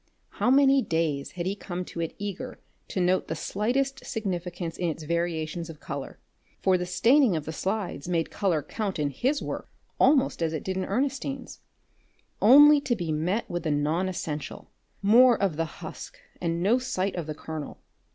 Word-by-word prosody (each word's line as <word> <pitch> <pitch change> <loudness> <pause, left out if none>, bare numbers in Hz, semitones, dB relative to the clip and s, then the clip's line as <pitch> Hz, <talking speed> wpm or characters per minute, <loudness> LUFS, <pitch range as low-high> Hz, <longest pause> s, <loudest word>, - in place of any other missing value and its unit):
How - - +3
many 275 0 +5
days 160 - -1
he 175 -1 -3
had 200 +2 -3
come 180 0 -5
to 170 - -8
it 165 - -3
eager 200 -2 -5 0.3
to - - -3
note 180 +1 +2
the 160 - -3
slightest 260 - -1
significance 180 -5 -4
in 175 -2 0
its 160 0 -5
variations 170 0 -2
of 155 -2 -10
colour, 140 -1 -6 0.4
for 190 -1 +3
the 180 0 -1
staining 240 - +4
of 155 -2 -3
the 160 - -4
slides 185 -2 -3
made 170 -2 0
colour 180 -8 0
count 205 +1 -3
in 145 -2 0
his 265 - 0
work - - -5 0.3
almost 275 - +4
as 165 -1 0
it 155 - -3
did 190 - -3
in 190 - -1
Ernestine's, 270 +3 -2 0.8
only 290 +6 +8
to 250 -4 0
be 175 -6 -3
met 175 +9 -1
with 175 0 -3
the 160 - -2
non 155 +5 +1
essential, 155 -5 -5 0.3
more 235 +3 +6
of 195 -6 +1
the 165 +1 0
husk 330 - -9 0.2
and 170 0 -1
no 230 +6 +4
sight 200 -7 -1
of 170 -4 -4
the 155 - -4
kernel. 155 -1 -6
180 Hz, 180 wpm, -27 LUFS, 165-225 Hz, 0.8 s, only